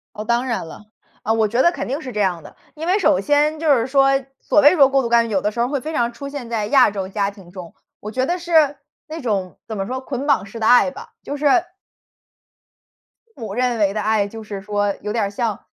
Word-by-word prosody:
哦， 215 - -5
当 240 +3 0
然 235 -8 -2
了。 210 - -12 0.4
啊， 220 - 0
我 220 -1 +2
觉 235 +4 0
得 345 - +5
肯 - - -5
定 275 +4 -3
是 260 -5 -7
这 210 - -3
样 180 -4 0
的， - - -14 0.2
因 315 +2 -6
为 370 +3 +2
首 280 - +3
先 295 +7 +1
就 310 -3 +4
是 230 -2 0
说， 270 0 +3 0.3
所 300 - +3
谓 295 +5 +7
说 275 -5 +6
过 270 0 +2
度 235 - -2
干 235 0 +4
预， - - -8
有 195 -2 0
的 210 - 0
时 235 - -4
候 240 - +1
会 280 0 -1
非 310 +5 -6
常 240 -5 0
出 280 +4 -7
现 280 -5 -7
在 225 -2 -2
亚 260 -6 +5
洲 195 -2 -5
家 200 0 -1
庭 195 -4 -16
中， 180 -2 -10 0.3
我 210 - -7
觉 255 +4 -1
得 350 +5 -1
是 315 -5 +2 0.3
那 320 +1 -7
种， 200 - -3
怎 220 - -5
么 195 -1 -3
说， 260 +3 -4
捆 265 +1 -5
绑 200 -9 +2
式 220 +3 -9
的 220 - -1
爱 250 +3 +5
吧， 460 - -11
就 285 - -5
是 290 - -6 1.9
父 - - -12
母 210 -3 -5
认 245 0 0
为 200 -2 +2
的 215 - -1
爱 215 -1 +1
就 225 +2 -9
是 205 -2 -7
说， 205 0 -1
有 210 0 -4
点 225 -3 0
儿 200 - -3
像 220 -1 -3
235 Hz, 275 characters per minute, -20 LUFS, 210-280 Hz, 1.9 s, 谓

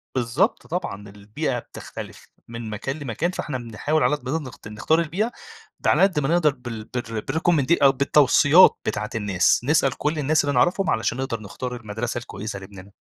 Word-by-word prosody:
بالضبط 125 +6 0
طبعًا، 105 - -4
البيئة 105 +7 -4
بتختلف - - -10 0.2
من 115 -1 -7
مكان 135 +8 -4
لمكان، 145 +6 -2
فإحنا 150 -6 -4
بنحاول 125 +6 -1
على 150 - +3
قد 130 -3 -8
ما - - -1
نقدر، 135 -5 -8
ت - - -12
نختار 110 +10 +1
البيئة. 185 +8 -1 0.5
ده - - +2
غلى - - +3
قد 185 -6 +3
ما 135 - -1
نقدر 165 -3 +3
بال 120 -4 -7
بالر 115 -1 -5
بالrecommend 160 +2 +1
أ 140 - +7
بالتوصيّات 145 +4 +5
بتاعة 105 0 -2
الناس. 100 -4 +2
نسأل 135 -1 +2
كل 150 +1 -1
الناس 150 +2 +2
اللي 145 -1 -1
نعرفهم، 175 +7 +2
علشان 110 +2 0
نقدر 130 -4 -3
نختار 125 +5 -6
المدرسة 115 +1 -4
الكويسة 105 -3 -6
لابْنِنا. 95 0 -12
130 Hz, 180 wpm, -23 LUFS, 110-150 Hz, 0.5 s, أ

